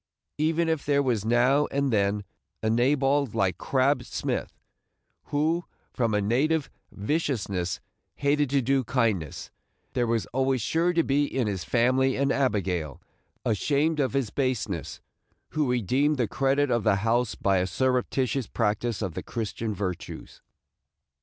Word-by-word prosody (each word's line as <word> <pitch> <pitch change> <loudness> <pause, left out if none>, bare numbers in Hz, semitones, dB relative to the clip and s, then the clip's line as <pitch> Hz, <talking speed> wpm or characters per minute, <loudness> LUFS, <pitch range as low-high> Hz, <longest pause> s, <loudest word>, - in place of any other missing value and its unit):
Even 165 +2 +2
if 160 -3 0
there 140 -1 +2
was 120 -6 0
now 125 +6 +3
and 140 -2 0
then 100 0 +1 0.4
a 110 - +2
Nabal 135 +4 +2
like 95 -2 0
Crab 135 0 +2
Smith, - - -3 0.7
who, 160 +4 0 0.3
from 115 -4 0
a 105 - +2
native 140 +8 +1 0.2
viciousness 100 - -1 0.4
hated 145 0 +1
to 140 -1 +2
do 135 +2 +2
kindness, 110 - -1 0.4
there 120 -1 +1
was 115 -1 0
always 135 0 +1
sure 165 +9 +1
to 165 -1 +2
be 145 +1 +2
in 130 -3 -1
his 95 -4 -2
family 130 +6 +2
an 140 0 +1
Abigail, 95 - 0 0.5
ashamed 150 +8 +1
of 130 -2 +1
his 135 -6 0
baseness, 115 - -2 0.5
who 150 -4 0
redeemed 130 +6 +1
the 120 -3 +1
credit 135 +4 +1
of 120 -3 +1
the 105 -1 +4
house 120 0 +1
by 100 -1 +1
a 90 0 +1
surreptitious 125 +3 0
practice 110 0 -1
of 90 - -3
the - - -4
Christian 115 -1 -4
virtues. 90 -3 -5
125 Hz, 145 wpm, -27 LUFS, 105-140 Hz, 0.7 s, the